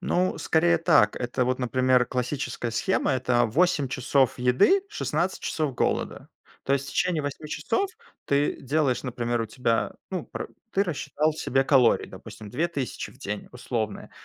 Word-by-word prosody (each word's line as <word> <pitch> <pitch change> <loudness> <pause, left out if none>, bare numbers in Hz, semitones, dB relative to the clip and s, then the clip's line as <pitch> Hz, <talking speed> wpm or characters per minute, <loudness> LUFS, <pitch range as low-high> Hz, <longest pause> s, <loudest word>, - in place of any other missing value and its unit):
Ну, 185 0 0
скорее 170 +1 +3
так. 155 -11 +4
Это 125 +1 -1
вот, 125 +1 0
например, 130 0 +2
классическая 125 -1 -3
схема- 190 - +1
это 125 -1 +2
8 155 +2 +2
часов 130 0 +1
еды, 125 - +4
16 175 - -2
часов 150 -5 -1
голода. - - -1 0.4
То 135 - +1
есть 140 0 0
в - - -6
течение 175 -4 +1
8 145 +2 -5
часов 390 - -1 0.3
ты 140 +1 +1
делаешь, 135 -3 +1
например, 120 -2 -2
у - - -4
тебя, 115 0 0 0.2
ну, 185 -4 -3
пр - - -6 0.2
ты 195 - +3
рассчитал 155 -3 -1
себе 135 -3 +1
калории, 130 -4 +4
допустим, 105 -2 -11
2000 145 0 -3
в - - -21
день 105 -5 -5
условные, 115 -3 -4
135 Hz, 155 wpm, -26 LUFS, 125-160 Hz, 0.4 s, так